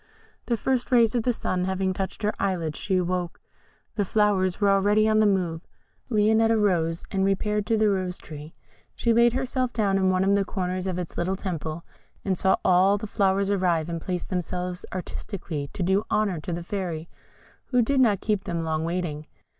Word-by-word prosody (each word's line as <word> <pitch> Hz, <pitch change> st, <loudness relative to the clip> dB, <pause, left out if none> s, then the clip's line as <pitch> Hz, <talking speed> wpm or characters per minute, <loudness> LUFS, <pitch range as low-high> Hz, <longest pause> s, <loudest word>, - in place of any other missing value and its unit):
The 235 Hz, -, +1 dB
first 255 Hz, +2 st, -1 dB
rays 235 Hz, -2 st, +5 dB
of 240 Hz, -, +1 dB
the 245 Hz, -, +1 dB
sun 185 Hz, -5 st, -2 dB
having 190 Hz, 0 st, 0 dB
touched 195 Hz, +3 st, -5 dB
her 210 Hz, -, +1 dB
eyelids, 175 Hz, -6 st, -1 dB
she 190 Hz, -2 st, 0 dB
awoke: 180 Hz, -1 st, -2 dB, 0.5 s
the 210 Hz, -, 0 dB
flowers 195 Hz, -2 st, +1 dB
were 200 Hz, -1 st, +4 dB
already 205 Hz, +2 st, +3 dB
on 215 Hz, 0 st, +3 dB
the 215 Hz, -, +5 dB
move. 175 Hz, -5 st, 0 dB, 0.5 s
Lionette 220 Hz, 0 st, +3 dB
arose, 180 Hz, -7 st, +1 dB
and 190 Hz, -1 st, 0 dB
repaired 210 Hz, +2 st, 0 dB
to 225 Hz, -, +2 dB
the 215 Hz, 0 st, +3 dB
Rose 185 Hz, -3 st, 0 dB
tree. 150 Hz, +1 st, -10 dB, 0.4 s
She 235 Hz, -, +1 dB
laid 235 Hz, +1 st, +4 dB
herself 255 Hz, -1 st, -1 dB
down 200 Hz, -3 st, +1 dB
in 190 Hz, -1 st, +3 dB
one 185 Hz, 0 st, +2 dB
of 195 Hz, +1 st, +3 dB
the 200 Hz, 0 st, +3 dB
corners 185 Hz, -1 st, -3 dB
of 185 Hz, -2 st, -2 dB
its 180 Hz, -2 st, -5 dB
little 185 Hz, +3 st, 0 dB
temple, 165 Hz, -4 st, -5 dB, 0.4 s
and 190 Hz, -2 st, +1 dB
saw 190 Hz, +2 st, +3 dB
all 185 Hz, +3 st, +5 dB
the 210 Hz, -, -6 dB
flowers 200 Hz, -1 st, +1 dB
arrive, 175 Hz, -5 st, +1 dB
and 165 Hz, -1 st, -4 dB
place 180 Hz, 0 st, -3 dB
themselves 180 Hz, 0 st, -4 dB
artistically 175 Hz, -5 st, -5 dB
to 185 Hz, -, -3 dB
do 190 Hz, +4 st, +2 dB
honour 200 Hz, -6 st, +1 dB
to 165 Hz, -, -6 dB
the 170 Hz, 0 st, -3 dB
Fairy, 170 Hz, -4 st, -4 dB, 0.6 s
who 250 Hz, -2 st, +2 dB
did 275 Hz, +4 st, +1 dB
not 215 Hz, -7 st, +3 dB
keep 210 Hz, -3 st, -1 dB
them 170 Hz, -1 st, -2 dB
long 160 Hz, -1 st, -1 dB
waiting. 165 Hz, -3 st, -3 dB
190 Hz, 195 wpm, -25 LUFS, 180-210 Hz, 0.6 s, rays